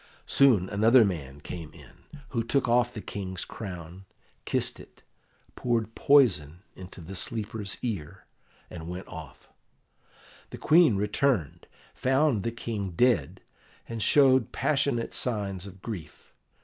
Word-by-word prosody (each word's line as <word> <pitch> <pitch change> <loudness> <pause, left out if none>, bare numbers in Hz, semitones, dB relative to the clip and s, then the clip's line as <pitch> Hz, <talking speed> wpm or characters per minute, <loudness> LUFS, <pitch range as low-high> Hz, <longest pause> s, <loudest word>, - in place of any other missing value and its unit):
Soon 120 -10 +4
another 110 +4 +5
man 75 -7 -5
came 80 0 -8
in, 150 - -16
who 115 -3 -1
took 130 +3 +1
off 120 0 +3
the 110 - -7
King's 95 -3 -5
crown, 90 -2 -8 0.4
kissed - - -1
it, - - -16 0.5
poured 115 -2 -1
poison 95 - +3
into 90 -1 -11
the 90 +4 -9
sleeper's 105 -1 -2
ear, 95 -6 -5 0.4
and 85 -1 -8
went 90 +2 -7
off. 80 -6 -11 1.0
The - - -8
Queen 160 - +5
returned, 105 - 0 0.3
found 135 -3 +2
the 115 - -2
King 105 -5 -4
dead, 125 +6 +1 0.5
and 115 -1 -5
showed 130 -1 +4
passionate 140 -5 0
signs 100 -5 -3
of 95 -1 -13
grief. 95 -10 -8
105 Hz, 125 wpm, -27 LUFS, 90-125 Hz, 1.0 s, another